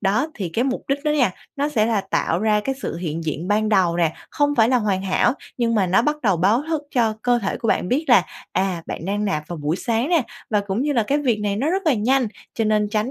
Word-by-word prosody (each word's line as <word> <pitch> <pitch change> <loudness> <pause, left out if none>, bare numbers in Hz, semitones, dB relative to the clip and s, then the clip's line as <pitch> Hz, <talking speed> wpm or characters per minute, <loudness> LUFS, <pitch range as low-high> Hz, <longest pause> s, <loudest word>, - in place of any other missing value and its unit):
Đó, 215 +9 +1
thì 190 -6 -4
cái 230 +10 -1
mục 260 -1 -2
đích 280 +2 -1
đó 300 - +2
nha, 255 -10 +3 0.3
nó 285 +2 0
sẽ 220 -7 +1
là 225 -3 +1
tạo 190 -3 -1
ra 215 -1 +2
cái 270 +5 -2
sự - - -3
hiện 165 -1 -4
diện 160 +4 -3
ban 215 +1 +2
đầu 185 -5 +3
nè, 165 -2 +2 0.2
không 290 0 +1
phải 225 -2 +4
là 255 - +3
hoàn 200 -4 0
hảo, 195 +5 +2 0.2
nhưng 230 -2 +1
mà 195 -4 +2
nó 190 +5 +3
bắt 300 +3 +1
đầu 195 -6 +3
báo 205 - +2
thức 315 -3 -1
cho 230 -4 +3
cơ 245 -1 +3
thể 200 -3 -2
của 225 - -3
bạn 180 - +1
biết 290 +6 +1
là, - - +7 0.3
à, 185 -3 -1
bạn 165 - -5
đang 205 +2 -1
nạp 170 -7 -1
vào 175 - -5
buổi 150 +4 -1
sáng 235 +6 -1
nè 335 -6 +3 0.3
và 210 -2 +2
cũng 200 +5 -2
như 295 0 0
là 235 -4 +2
cái 280 +7 0
việc 240 -7 0
này 205 -1 -1
nó 285 +8 0
rất 385 +1 0
là 300 - +4
nhanh, 245 +2 +2 0.3
cho 225 - 0
nên 210 -1 +2
tránh 215 +4 -1
215 Hz, 275 wpm, -22 LUFS, 195-255 Hz, 0.3 s, là